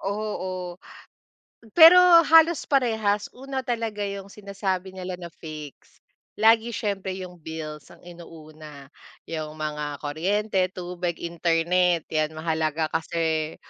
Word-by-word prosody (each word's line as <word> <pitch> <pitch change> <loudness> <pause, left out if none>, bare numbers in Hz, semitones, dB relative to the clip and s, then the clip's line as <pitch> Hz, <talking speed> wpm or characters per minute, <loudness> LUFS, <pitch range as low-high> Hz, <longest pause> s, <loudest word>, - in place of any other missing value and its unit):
oo, 185 -3 -4 1.0
pero 345 +2 +10 0.2
halos 325 0 +5
parehas 220 -6 +1
una 270 +1 -5
talaga 225 -3 -3
'yong 200 0 -7
sinasabi 195 -2 -4
nila 180 -1 -6
na 175 - -7
fix, 155 -4 -11 0.4
lagi 225 +2 +4
siyempre 200 -4 -3
'yong 180 -1 -8
bills 155 -3 -8
ang - - -16
inuuna, 155 -4 -12 0.4
'yong 155 -2 -5
mga 150 -1 -4
kuryente, 190 +8 -1
tubig, 175 -1 -5
internet, 170 0 +1
'yan 155 -1 -1
mahalaga 160 -1 -1
kasi 160 -1 -1
180 Hz, 110 wpm, -25 LUFS, 160-205 Hz, 1.0 s, pero